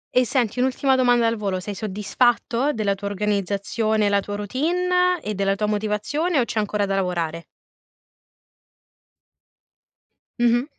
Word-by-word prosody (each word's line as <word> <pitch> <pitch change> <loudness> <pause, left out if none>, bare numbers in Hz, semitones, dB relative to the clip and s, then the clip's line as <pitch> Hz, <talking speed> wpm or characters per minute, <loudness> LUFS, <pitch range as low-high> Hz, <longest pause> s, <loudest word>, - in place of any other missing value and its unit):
E 250 0 +5
senti 245 -2 0
un'ultima 265 +1 +2
domanda 245 -2 +3
al 230 0 +1
volo, 195 -3 -2
sei 205 +2 -6
soddisfatto 230 +6 0
della 215 -6 0
tua 200 +1 -6
organizzazione, 205 +1 0
la 200 - +3
tua 205 +1 -5
routine 360 - +1
e 215 - -3
della 195 0 0
tua 210 +2 -1
motivazione 215 - -1
o 245 - +2
c'è 225 - -2
ancora 210 -1 0
da 195 - -2
lavorare? 170 -4 -2 2.9
Mh-mh. 240 +1 +3
215 Hz, 135 wpm, -23 LUFS, 200-250 Hz, 2.9 s, E